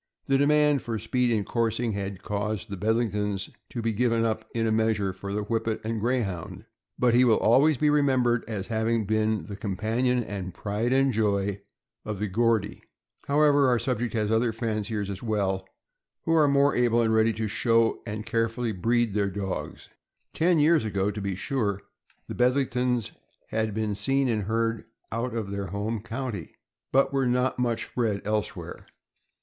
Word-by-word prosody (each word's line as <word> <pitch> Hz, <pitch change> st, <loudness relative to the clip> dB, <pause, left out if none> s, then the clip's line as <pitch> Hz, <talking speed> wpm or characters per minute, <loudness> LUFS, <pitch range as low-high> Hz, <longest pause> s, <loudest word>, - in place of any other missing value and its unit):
The 135 Hz, 0 st, +2 dB
demand 150 Hz, -1 st, +4 dB
for 115 Hz, -1 st, -3 dB
speed 125 Hz, +3 st, 0 dB
in 110 Hz, -3 st, +1 dB
coursing 115 Hz, 0 st, 0 dB
had 100 Hz, -2 st, -5 dB
caused 105 Hz, 0 st, -3 dB
the -, -, -2 dB
Bedlingtons 105 Hz, -1 st, -1 dB, 0.2 s
to 120 Hz, -, -5 dB
be 115 Hz, 0 st, 0 dB
given 115 Hz, 0 st, +1 dB
up, 110 Hz, -1 st, -2 dB
in 115 Hz, -1 st, -1 dB
a 110 Hz, -, +1 dB
measure, 110 Hz, -3 st, +1 dB
for 100 Hz, +2 st, -7 dB
the 105 Hz, +1 st, -1 dB
Whippet 115 Hz, +1 st, -1 dB
and 110 Hz, 0 st, -2 dB
Greyhound; 110 Hz, -8 st, -2 dB, 0.3 s
but 125 Hz, -2 st, +3 dB
he 125 Hz, +1 st, +6 dB
will 115 Hz, -3 st, +5 dB
always 135 Hz, +6 st, +4 dB
be 150 Hz, +3 st, +3 dB
remembered 130 Hz, -5 st, +2 dB
as 105 Hz, -4 st, -4 dB
having 110 Hz, -1 st, 0 dB
been 110 Hz, -3 st, 0 dB
the 100 Hz, -, -7 dB
companion 115 Hz, +5 st, 0 dB
and 95 Hz, -4 st, -6 dB
pride. 105 Hz, +4 st, -2 dB
and 135 Hz, 0 st, +3 dB
joy 100 Hz, -2 st, 0 dB, 0.4 s
of 105 Hz, -1 st, -4 dB
the 105 Hz, +2 st, -2 dB
"Geordie." 110 Hz, 0 st, 0 dB, 0.5 s
However, 145 Hz, -1 st, +4 dB
our 125 Hz, -, +3 dB
subject 120 Hz, -1 st, -2 dB
has 105 Hz, -1 st, 0 dB
other 115 Hz, +1 st, +2 dB
fanciers 110 Hz, -2 st, -2 dB
as 100 Hz, -1 st, -6 dB
well 95 Hz, -4 st, -1 dB, 0.6 s
who 165 Hz, -, +1 dB
are 155 Hz, -2 st, +5 dB
more 140 Hz, 0 st, +3 dB
able 120 Hz, -1 st, +3 dB
and 110 Hz, -1 st, +2 dB
ready 110 Hz, 0 st, +4 dB
to 110 Hz, 0 st, -2 dB
show 115 Hz, +1 st, +2 dB
and 105 Hz, 0 st, -5 dB
carefully 115 Hz, 0 st, -1 dB
breed 115 Hz, +3 st, +1 dB
their 100 Hz, -1 st, +1 dB
dogs. 95 Hz, -1 st, -5 dB, 0.5 s
Ten 170 Hz, +1 st, +3 dB
years 155 Hz, -1 st, +4 dB
ago, 100 Hz, -2 st, 0 dB
to 105 Hz, 0 st, -6 dB
be 100 Hz, -1 st, -2 dB
sure, 105 Hz, -3 st, -1 dB, 0.5 s
the -, -, -5 dB
Bedlingtons 125 Hz, -2 st, +1 dB, 0.4 s
had 110 Hz, -1 st, -1 dB
been 110 Hz, -1 st, -1 dB
seen 135 Hz, +7 st, +1 dB
and 110 Hz, -4 st, 0 dB
heard 115 Hz, +1 st, 0 dB
of -, -, -16 dB, 0.3 s
out 115 Hz, +1 st, -2 dB
of 105 Hz, -4 st, -3 dB
their 100 Hz, -1 st, -3 dB
home 105 Hz, +4 st, -3 dB
county, 115 Hz, -, -5 dB, 0.4 s
but 135 Hz, +1 st, +3 dB
were 135 Hz, -2 st, +1 dB
not 125 Hz, +1 st, +1 dB
much 120 Hz, -2 st, -1 dB
bred 110 Hz, -5 st, 0 dB
elsewhere. 105 Hz, 0 st, -3 dB
115 Hz, 175 wpm, -26 LUFS, 105-125 Hz, 0.6 s, he